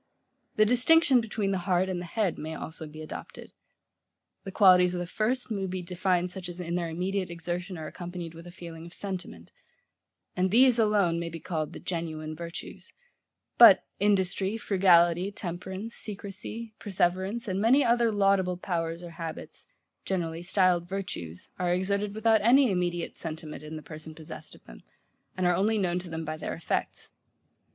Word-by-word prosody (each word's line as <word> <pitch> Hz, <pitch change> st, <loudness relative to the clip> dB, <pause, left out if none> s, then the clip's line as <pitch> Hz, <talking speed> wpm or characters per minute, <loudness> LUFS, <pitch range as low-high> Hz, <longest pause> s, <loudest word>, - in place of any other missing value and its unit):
The 215 Hz, -, +5 dB
distinction 255 Hz, +3 st, +5 dB
between 215 Hz, -3 st, -2 dB
the 190 Hz, -, 0 dB
heart 180 Hz, +1 st, +3 dB
and 180 Hz, -2 st, -3 dB
the -, -, -6 dB
head 195 Hz, 0 st, -1 dB
may 160 Hz, +1 st, -5 dB
also 160 Hz, 0 st, -7 dB
be 155 Hz, +1 st, -9 dB
adopted: 155 Hz, -, -9 dB, 0.9 s
the 195 Hz, -, -6 dB
qualities 180 Hz, -3 st, +6 dB
of -, -, -2 dB
the 175 Hz, -, -2 dB
first 225 Hz, +7 st, -1 dB
may 195 Hz, -3 st, -1 dB
be 185 Hz, 0 st, -4 dB
defined 180 Hz, 0 st, 0 dB
such 185 Hz, -1 st, -7 dB
as 175 Hz, +1 st, -8 dB
in 170 Hz, -1 st, -4 dB
their 175 Hz, -1 st, -1 dB
immediate 185 Hz, +3 st, -2 dB
exertion 175 Hz, +2 st, -4 dB
are 160 Hz, -, -6 dB
accompanied 175 Hz, 0 st, -7 dB
with 165 Hz, +1 st, -11 dB
a -, -, -9 dB
feeling 170 Hz, -2 st, -9 dB
of 170 Hz, -, -9 dB
sentiment; 185 Hz, -, -6 dB, 0.8 s
and 185 Hz, +1 st, +1 dB
these 245 Hz, +3 st, +5 dB
alone 205 Hz, -6 st, +3 dB
may 170 Hz, 0 st, -3 dB
be 165 Hz, 0 st, -7 dB
called 155 Hz, -3 st, -3 dB
the -, -, -9 dB
genuine 155 Hz, -3 st, -4 dB
virtues: 170 Hz, +1 st, -8 dB, 0.7 s
but -, -, +9 dB
industry, 195 Hz, 0 st, +1 dB
frugality, 180 Hz, -2 st, +4 dB
temperance, 190 Hz, +3 st, -6 dB
secrecy, 210 Hz, +2 st, -7 dB
perseverance, 195 Hz, +3 st, -1 dB
and 190 Hz, 0 st, -1 dB
many 255 Hz, +6 st, +5 dB
other 235 Hz, -1 st, +3 dB
laudable 195 Hz, -3 st, +2 dB
powers 170 Hz, -2 st, -3 dB
or 170 Hz, -, -8 dB
habits, 165 Hz, -1 st, -8 dB, 0.4 s
generally 170 Hz, -3 st, -2 dB
stilled 175 Hz, -1 st, +2 dB
virtues 130 Hz, -, -6 dB
are 180 Hz, -1 st, +1 dB
exerted 200 Hz, +3 st, 0 dB
without 220 Hz, 0 st, +3 dB
any 250 Hz, +2 st, +5 dB
immediate 175 Hz, -2 st, -1 dB
sentiment 160 Hz, -2 st, -6 dB
in 155 Hz, +1 st, -8 dB
the 155 Hz, -, -7 dB
person 155 Hz, 0 st, -9 dB
possessed 155 Hz, -1 st, -10 dB
of -, -, -19 dB
them, -, -, -13 dB, 0.6 s
and 185 Hz, -, 0 dB
are 175 Hz, 0 st, +4 dB
only 210 Hz, +4 st, +2 dB
known 180 Hz, -3 st, 0 dB
to 180 Hz, -1 st, -9 dB
him 160 Hz, 0 st, -4 dB
by 155 Hz, 0 st, -4 dB
their 155 Hz, -, -4 dB
effects. 165 Hz, -, -3 dB
180 Hz, 170 wpm, -28 LUFS, 170-200 Hz, 0.9 s, but